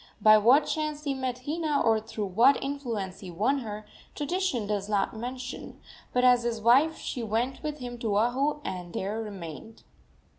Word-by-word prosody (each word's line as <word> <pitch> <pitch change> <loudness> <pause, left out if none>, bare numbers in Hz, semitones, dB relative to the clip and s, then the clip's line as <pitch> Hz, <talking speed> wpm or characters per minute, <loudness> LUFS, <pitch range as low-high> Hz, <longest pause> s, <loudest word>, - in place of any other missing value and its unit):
By 215 0 +7
what 250 +8 +5
chance 305 -1 -2
he 285 -2 -1
met 255 -1 -4
Hina, 305 -1 0
or 225 -1 +3
through 215 -1 -5
what 230 +9 +4
influence 230 -9 -4
he 190 - -9
won 220 +11 +1
her, 215 -3 -6 0.3
tradition 295 - -1
does 205 -1 -2
not 205 +1 0
mention, 250 +2 -6 0.3
but 250 - +1
as 250 -1 +6
his 235 -1 -2
wife 265 +8 +4
she 250 - -4
went 230 +4 -1
with 300 -1 -4
him 245 -3 -7
to 215 -3 0
Oahu, 270 +7 +1
and 180 -2 -5
there 205 +4 -2
remained. 200 0 -8
240 Hz, 175 wpm, -28 LUFS, 210-275 Hz, 0.3 s, By